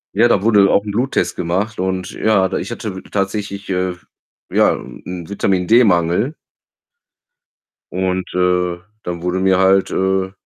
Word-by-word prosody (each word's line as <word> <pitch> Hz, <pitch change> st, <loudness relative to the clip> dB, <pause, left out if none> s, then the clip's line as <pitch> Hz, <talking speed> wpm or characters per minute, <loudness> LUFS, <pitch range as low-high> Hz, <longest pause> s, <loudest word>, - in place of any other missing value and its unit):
ja, 115 Hz, +3 st, +5 dB
da 100 Hz, -4 st, +2 dB
wurde 110 Hz, -2 st, +4 dB
halt 100 Hz, -, +5 dB
auch 100 Hz, -, +3 dB
'n 105 Hz, -, -3 dB
Bluttest 125 Hz, +6 st, 0 dB
gemacht 95 Hz, +5 st, -2 dB
und 95 Hz, -1 st, -2 dB
ja, 100 Hz, -4 st, +2 dB
da 95 Hz, -, -3 dB
ich -, -, -5 dB
hatte 105 Hz, -5 st, -5 dB
tatsächlich, 100 Hz, 0 st, -3 dB
äh, 90 Hz, 0 st, 0 dB
f 90 Hz, -, -20 dB, 0.5 s
ja, -, -, +4 dB
'n -, -, -10 dB
'n 90 Hz, -2 st, -6 dB
Vitamin-D-Mangel 100 Hz, -, +2 dB, 1.6 s
und, 95 Hz, 0 st, -1 dB
äh, 90 Hz, -1 st, +1 dB, 0.3 s
dann 85 Hz, -1 st, -5 dB
wurden 90 Hz, +1 st, -1 dB
mir 95 Hz, -1 st, +4 dB
halt, 95 Hz, 0 st, +3 dB
äh, 95 Hz, 0 st, 0 dB
95 Hz, 155 wpm, -18 LUFS, 90-100 Hz, 1.6 s, ja